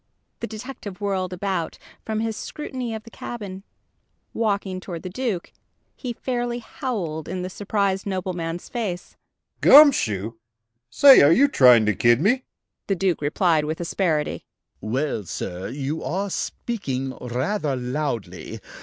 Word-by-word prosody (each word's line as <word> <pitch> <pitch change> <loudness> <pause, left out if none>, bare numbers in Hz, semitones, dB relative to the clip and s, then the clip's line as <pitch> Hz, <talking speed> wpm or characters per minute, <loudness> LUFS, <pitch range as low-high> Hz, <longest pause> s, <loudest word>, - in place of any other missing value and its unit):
The - - -4
detective 215 -3 -8
whirled 190 -3 -1
about, 180 -2 -2 0.3
from 220 0 -2
his 225 -1 -2
scrutiny 255 -4 -5
of 220 - -7
the 230 - -14
cabin, 200 -6 -7 0.7
walking 200 -4 -1
toward 175 -3 -7
the 185 - -6
Duke. 215 -5 -3 0.4
He 250 - -5
fairly 240 0 -2
howled 200 - -4
in 180 0 -3
the 185 - -5
surprised 200 -1 -1
nobleman's 175 -3 -3
face: 200 -7 -4 0.5
"Gum 295 +1 +10
shoe! 110 - -2 0.5
Say, 275 - +8
are 145 - +7
you 275 +11 +6
trying 125 - +6
to 105 - +2
kid 120 +6 +4
me?" 245 - +2 0.4
The 195 - +1
Duke 185 -3 0
replied 155 +1 +2
with 155 +1 -3
asperity: 165 -3 -1 0.4
"Well, 115 0 -2
sir. 90 +2 -5
You 145 +3 -3
are 195 +3 -2
speaking 135 - -3
rather 135 - -1
loudly. 125 -2 -4
185 Hz, 135 wpm, -23 LUFS, 150-220 Hz, 0.7 s, Gum